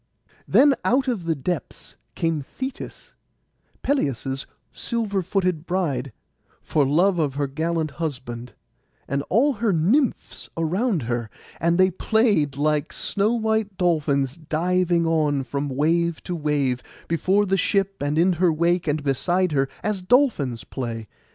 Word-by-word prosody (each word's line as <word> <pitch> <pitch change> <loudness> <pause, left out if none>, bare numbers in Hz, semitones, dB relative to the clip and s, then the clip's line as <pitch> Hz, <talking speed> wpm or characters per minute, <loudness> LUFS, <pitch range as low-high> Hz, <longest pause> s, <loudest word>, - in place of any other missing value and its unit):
Then 285 0 +6
out 260 +2 +2
of 225 -9 -1
the 165 -1 +1
depths 160 +4 -5 0.2
came 165 -2 0
Thetis, 260 - -7 0.7
Peleus' 135 - -1 0.2
silver 215 -5 -1
footed 185 -3 -1
bride, 145 -8 -1 0.5
for 145 -3 +1
love 175 +6 +3
of 145 -4 0
her 145 0 0
gallant 160 +2 -2
husband, 125 -6 -5 0.5
and 140 +1 -1
all 275 +8 +3
her 225 -2 0
nymphs 210 - 0
around 180 - 0
her; 120 -1 -2 0.3
and 170 +1 +2
they 185 0 +4
played 190 - +1
like 150 0 +1
snow 205 +3 +1
white 220 -3 0
dolphins, 145 -5 +1
diving 170 +2 +1
on 150 -4 +1
from 140 +3 -3
wave 165 +5 +1
to 180 - -3
wave, 145 -5 0 0.3
before 185 +5 +2
the 195 0 +1
ship, 195 -1 0
and 145 +2 0
in 180 +3 +4
her 175 0 +3
wake, 170 +2 +1
and 150 0 0
beside 175 +6 +1
her, 135 -2 +1
as 210 -3 -1
dolphins 180 - +2
play. 115 -4 -5
165 Hz, 140 wpm, -23 LUFS, 145-190 Hz, 0.7 s, Then